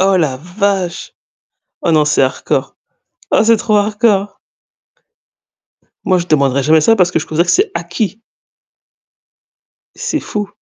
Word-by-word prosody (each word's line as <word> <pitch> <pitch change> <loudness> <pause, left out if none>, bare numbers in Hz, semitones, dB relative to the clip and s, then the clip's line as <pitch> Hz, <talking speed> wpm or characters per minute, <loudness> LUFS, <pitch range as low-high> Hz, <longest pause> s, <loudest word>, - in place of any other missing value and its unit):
Oh 190 0 +3
la 140 -6 0
vache! 180 +2 -3 0.7
Oh 170 - +1
non 155 -2 +3
c'est 150 - +2
hardcore. 130 - -2 0.6
Oh - - +4
c'est 230 0 +4
trop 215 -1 +1
hardcore. 205 -1 0 1.7
Moi 185 -1 +2
je 175 - -4
demanderai 140 -3 +1
jamais 155 +2 +4
ça 225 +9 +3
parce 180 -2 +2
que 170 - 0
je 160 - -6
considère 165 +3 0
que - - +2
c'est 395 +2 +2
acquis. 195 +5 -3 1.7
C'est 310 - -3
fou! 205 -1 -4
185 Hz, 140 wpm, -15 LUFS, 160-210 Hz, 1.7 s, Oh